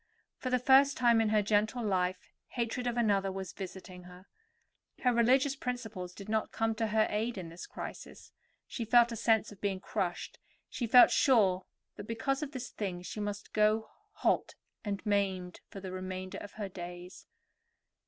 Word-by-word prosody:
For 255 - -3
the 250 - +3
first 270 +3 +5
time 235 -2 +4
in 220 - +1
her 215 -1 +3
gentle 215 +3 +1
life 185 -2 -1 0.2
hatred 245 +1 -2
of 240 0 -1
another 200 -4 +2
was 190 -1 -6
visiting 185 -1 -9
her. 180 +1 -13 0.8
Her 250 -1 +4
religious 260 +4 +3
principles 225 -9 -5
did 200 - -10
not 220 0 -1
come 225 0 0
to 225 0 -1
her 215 0 +3
aid 220 +2 -1
in 175 -3 -6
this 170 +2 -9
crisis; - - -9 0.3
she 235 - -5
felt 235 +1 +5
a - - -3
sense 220 -1 +2
of 205 - -14
being 195 -2 -1
crushed, 180 -2 -3 0.3
she 240 - -3
felt 245 +2 +8
sure 200 -9 +3 0.3
that 205 - -8
because 250 +5 -1
of 295 -2 -4
this 260 -4 -6
thing 180 -4 -4
she 210 - -6
must 205 0 -5
go 215 +1 +2 0.2
halt - - 0 0.3
and 205 -1 -4
maimed 190 -3 -1
for 195 - -8
the 190 -1 -7
remainder 185 0 -5
of 205 - -10
her 210 -2 -4
days. 180 0 -9
210 Hz, 175 wpm, -31 LUFS, 190-235 Hz, 0.8 s, felt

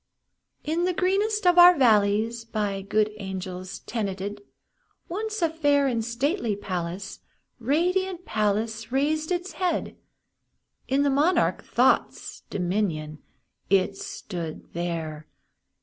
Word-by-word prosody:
In 330 +3 0
the 365 -1 0
greenest 405 +3 +1
of 355 0 +6
our 355 0 +9
valleys 220 -1 +3
By 210 -3 -2
good 210 +2 +1
angels 185 -2 -6
tenanted, 205 -2 -4 0.7
Once 430 +2 -3
a 330 - +3
fair 290 -3 +2
and 235 -4 0
stately 240 - -1
palace 185 -1 -5 0.4
Radiant 355 +8 0
palace 220 +1 -1
reared 305 +4 0
its 360 +1 -2
head. 365 -2 -2 0.9
In 275 +2 +2
the 285 - +2
monarch 300 +7 +2
Thought's - - +1
dominion 175 -5 -2 0.5
It 195 0 +3
stood 170 -5 -7
there! 165 -3 -4
225 Hz, 110 wpm, -26 LUFS, 195-325 Hz, 0.9 s, our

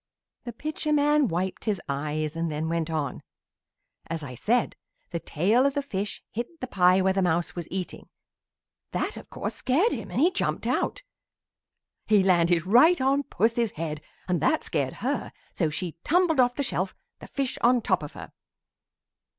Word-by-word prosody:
The 240 - -5
Pitcher 305 +4 -3
man 295 -1 +4
wiped 180 +1 -2
his 210 -4 0
eyes 150 +2 -2
and 165 -1 -1
then 155 +2 -2
went 165 0 -1
on: 150 -4 -2 0.9
"As 165 -1 -4
I 130 -3 -6
said, 230 - +1 0.4
the 170 - -2
tail 200 - +2
of 280 0 +1
the 285 - 0
fish 205 -6 -4
hit 240 +9 -5
the 255 - -3
pie 185 -5 +4
where 190 0 +3
the 195 - +1
mouse 175 -1 0
was 175 -2 -5
eating. 185 -1 -5 0.8
That, - - -1
of - - -10
course, - - -4
scared 315 - +2
him 215 -5 -4
and 185 - -2
he 340 +6 +5
jumped - - -1
out. - - -1 1.0
"He 210 -3 +5
landed 175 -2 +3
right 250 - +6
on 270 +2 +2
Puss's 230 -2 0
head 155 -1 -4 0.3
and 175 -4 0
that 310 - +2
scared - - -1
her - - -1 0.2
so 165 -4 +1
she 165 +2 -4
tumbled 340 -3 +3
off 245 -1 +4
the 285 - -1
shelf, 190 -7 -2 0.2
the - - -10
fish 275 -2 -2
on 245 +1 +5
top 190 -6 +1
of 150 - -7
her. - - -9
195 Hz, 175 wpm, -26 LUFS, 165-260 Hz, 1.0 s, right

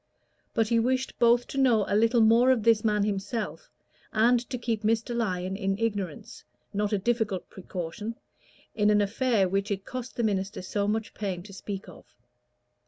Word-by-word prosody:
But 225 -1 +2
he 230 - +3
wished 255 +3 -1
both 240 0 +4
to 275 - -3
know 235 -6 +4
a - - 0
little 230 +2 +4
more 230 +3 +5
of 250 -4 +3
this 225 -1 +4
man 210 -2 +2
himself, 210 - -3 0.4
and 235 +3 +4
to 255 - -3
keep 230 -3 -2
Mr. 225 +2 0
Lyon 190 -5 -1
in 195 -1 -1
ignorance 225 +1 -3 0.3
not 205 +1 0
a 210 - +2
difficult 220 -2 -1
precaution 190 +4 -6 0.6
in 210 -1 +2
an 210 0 +4
affair 210 0 +2
which 195 +3 -1
it 200 -1 -3
cost 255 -1 -6
the 235 - -1
minister 195 -2 -1
so 200 +2 -1
much 220 +1 -2
pain 190 -4 -4
to 200 0 -12
speak 195 0 -6
of. 180 - -15
215 Hz, 175 wpm, -27 LUFS, 200-235 Hz, 0.6 s, more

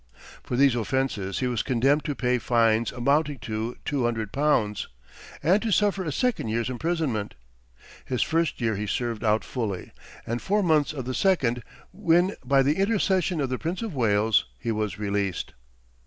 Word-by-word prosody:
For - - -4
these 140 -1 +5
offenses 120 -5 -1
he 130 - +1
was 120 -3 0
condemned 135 +4 +2
to 145 -3 -2
pay 125 -1 +1
fines 115 -1 +2
amounting 140 +4 +1
to 110 +3 -4
two 140 -3 0
hundred 115 -3 -1
pounds, 120 -8 +1 0.6
and 190 +6 +4
to 230 - -1
suffer 200 -1 +2
a 160 - -3
second 250 - 0
year's 115 +3 -1
imprisonment. 130 -6 -2 0.7
His 125 - 0
first 165 0 0
year 115 -3 0
he 105 +1 -3
served 115 +1 -2
out 110 0 +2
fully, 110 -8 -4 0.3
and 120 +1 -3
four 205 +1 +1
months 155 -4 +3
of 135 -5 -5
the 130 - -3
second, 125 -10 +2 0.3
when 175 +4 +2
by 135 +1 +3
the 145 +3 +1
intercession 190 -4 +1
of 135 -3 0
the 130 - -2
Prince 175 +7 -3
of 220 -6 -4
Wales 110 - +2
he 115 - -3
was 105 -2 -2
released. 100 -2 -2
125 Hz, 170 wpm, -26 LUFS, 110-155 Hz, 0.7 s, these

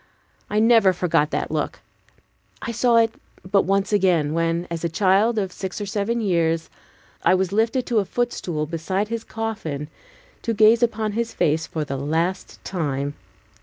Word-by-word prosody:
I 210 - -1
never 220 -3 +5
forgot 170 -4 +1
that - - -2
look. - - -2 0.8
I 235 - -4
saw 235 +1 +3
it 225 -1 +3 0.3
but 195 +1 +2
once 195 +2 +1
again, 175 -7 +2
when, 165 +1 0
a 170 0 -2
child 200 +6 +3
of 195 -3 -1
six 190 +2 -5
or 205 - -3
seven 205 +4 -1
years, 165 -5 0 0.5
I - - +5
was 185 0 0
lifted 225 +5 +1
to 235 -3 +2
a 200 - 0
footstool 180 -10 -2
beside 185 +6 -2
his 230 -1 -3
coffin 210 -10 -4 0.5
to 230 -2 -2
gaze 220 +2 +5
upon 220 -2 +1
his 230 +2 -3
face 155 +1 +1
for 155 -2 -3
the 140 -1 -4
last 165 +7 -2
time. 145 -5 -2
190 Hz, 165 wpm, -23 LUFS, 165-220 Hz, 0.8 s, never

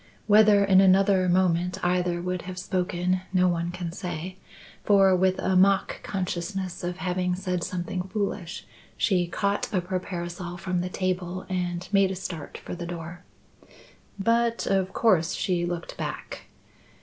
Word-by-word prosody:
Whether 210 -1 +6
in 190 -1 +6
another 190 -1 +4
moment 180 0 +2
either 175 -1 +1
would 180 -1 -2
have 185 - -7
spoken 180 0 -1
no 185 -1 +3
one 170 -1 0
can 175 -1 -5
say, 180 -1 -5 0.5
for, 195 -2 +5
with 185 +1 +2
a 190 - 0
mock 195 +1 +3
consciousness 185 -1 -3
of 175 0 -3
having 180 0 -1
said 180 -2 -2
something 180 0 -3
foolish, 200 -4 -3 0.3
she 180 -5 +2
caught 200 +3 -1
up 185 -4 -1
her 185 -2 0
parasol 175 -1 -6
from 180 0 -2
the 180 - -3
table 185 0 -2
and 180 -1 -2
made 195 -2 +4
a 190 - -3
start 175 -4 -6
for - - -8
the 175 -1 -5
door. 170 0 -7 0.9
But 230 +3 +1
of 190 -1 +1
course 185 -8 +2
she 175 -2 0
looked 170 -1 -5
back. - - -6
185 Hz, 150 wpm, -26 LUFS, 175-190 Hz, 0.9 s, Whether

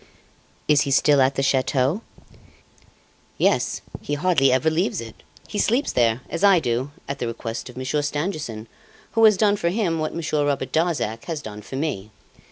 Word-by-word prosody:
"Is 150 -1 +5
he 140 - -1
still 140 +1 +4
at 130 +1 +3
the 135 - 0
chateau?" 135 - +1 1.4
"Yes; - - +1 0.2
he 145 - -2
hardly 145 -5 +3
ever 140 +5 +2
leaves 170 - 0
it! 115 -1 -9 0.3
He 205 - -4
sleeps 245 +8 +1
there, 115 0 +2
as 165 - -4
I 195 -3 +6
do, 125 0 -1 0.2
at 140 0 -4
the 120 - -2
request 115 +1 -5
of 125 - -12
Monsieur 130 +3 -1
Stangerson, 145 - -3 0.5
who 225 - +2
has 215 -3 +6
done 205 -1 +3
for 170 - 0
him 175 -4 0
what 155 0 -3
Monsieur 155 -3 -1
Robert 140 -2 -1
Darzac 150 -10 -1
has 160 -3 -4
done 105 -1 -8
for 120 - -9
me. 130 -9 -3
145 Hz, 175 wpm, -23 LUFS, 125-165 Hz, 1.4 s, I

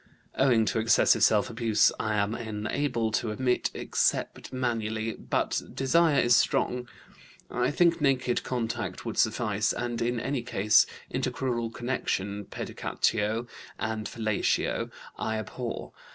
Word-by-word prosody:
"Owing 120 -5 +3
to 110 - 0
excessive 115 0 +4
self 105 -2 +4
abuse, 115 -2 +3
I 110 0 0
am 105 +1 +1
unable 110 +2 -2
to 110 +1 0
emit 125 +4 0
except - - -1
manually, 115 -3 -2
but - - -1
desire 155 +2 +3
is 120 0 +5
strong. 125 0 +1 0.6
I 125 +1 +1
think 170 +2 +3
naked 130 -3 +2
contact 120 -3 -3
would 115 - -3
suffice, 110 -1 +1
and 120 -1 -3
in 120 0 0
any 135 +2 -2
case 105 -3 +4 0.3
intercrural 120 -3 -1
connection. 105 -5 -2
Pedicatio 110 +4 -1 0.3
and 110 -1 -3
fellatio 110 -3 0 0.3
I 110 0 -1
abhor. 115 +2 -5
115 Hz, 125 wpm, -28 LUFS, 110-125 Hz, 0.6 s, is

